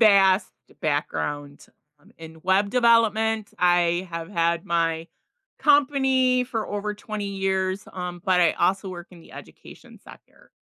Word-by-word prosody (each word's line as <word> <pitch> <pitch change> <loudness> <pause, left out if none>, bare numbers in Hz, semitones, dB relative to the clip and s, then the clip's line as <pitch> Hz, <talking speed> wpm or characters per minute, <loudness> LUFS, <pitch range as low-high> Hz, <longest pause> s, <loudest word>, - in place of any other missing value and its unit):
vast 195 -3 +4 0.3
background 145 -1 -3 0.3
um, - - -23
in 160 0 -11
web 195 +2 +2
development. 225 -3 +2
I 175 0 +2
have 165 0 -6
had 170 -3 0
my 165 -1 0 0.5
company 265 -3 +3
for 230 -3 -4
over 205 0 -3
20 210 0 -6
years, 190 0 -1
um, 180 -1 -6
but 185 -1 +3
I 170 -2 +4
also 190 +3 0
work 175 -1 -8
in 175 -2 -15
the - - -17
education - - -14
sector. - - -18
190 Hz, 135 wpm, -24 LUFS, 170-220 Hz, 0.5 s, vast